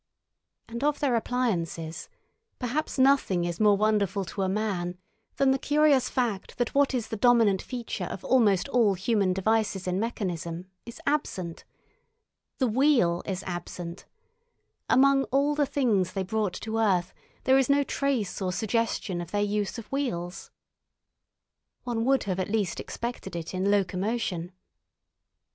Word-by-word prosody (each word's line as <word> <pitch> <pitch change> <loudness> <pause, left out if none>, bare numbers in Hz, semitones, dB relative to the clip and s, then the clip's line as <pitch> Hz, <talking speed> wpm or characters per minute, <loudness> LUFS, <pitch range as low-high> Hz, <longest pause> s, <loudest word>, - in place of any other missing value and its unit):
And 235 +3 -5
of 295 0 +2
their 270 -4 +2
appliances, 180 -10 -2 0.5
perhaps 270 +6 -2
nothing 260 -10 +3
is 170 -1 -3
more 210 -2 +5
wonderful 205 -2 +1
to 195 +3 -5
a 190 - +1
man 185 -4 -2 0.4
than 275 -1 +3
the 265 - +1
curious 295 -2 +3
fact 235 -7 -2
that 245 -2 -1
what 280 -1 +3
is 235 -3 -2
the - - -3
dominant 225 -4 +4
feature 235 -6 -5
of 190 - -7
almost 210 -8 +3
all 230 -7 +3
human 195 0 +1
devices 195 0 0
in 180 +1 -1
mechanism 180 -6 -3 0.2
is 235 - -9
absent—the 250 - -5
wheel 235 - +3
is 190 -2 -3
absent; 175 0 -6 0.8
among 275 +1 +5
all 280 +2 +1
the 295 -1 +1
things 210 -11 +1
they 195 - -1
brought 205 -1 -1
to 225 0 -2
earth 185 -5 +1 0.3
there 265 +1 +5
is 265 - +1
no 285 0 +4
trace 265 -9 -1
or 185 -1 0
suggestion 220 -3 -1
of 170 - -7
their 205 0 0
use 205 0 -1
of 230 - -7
wheels. 185 -11 -3 1.3
One 235 -2 -2
would 270 +1 +3
have 190 -2 -2
at 185 - -2
least 205 -5 -1
expected 235 -6 -5
it 165 +1 -5
in 185 +2 0
locomotion. 195 -2 -1
215 Hz, 145 wpm, -27 LUFS, 185-250 Hz, 1.3 s, more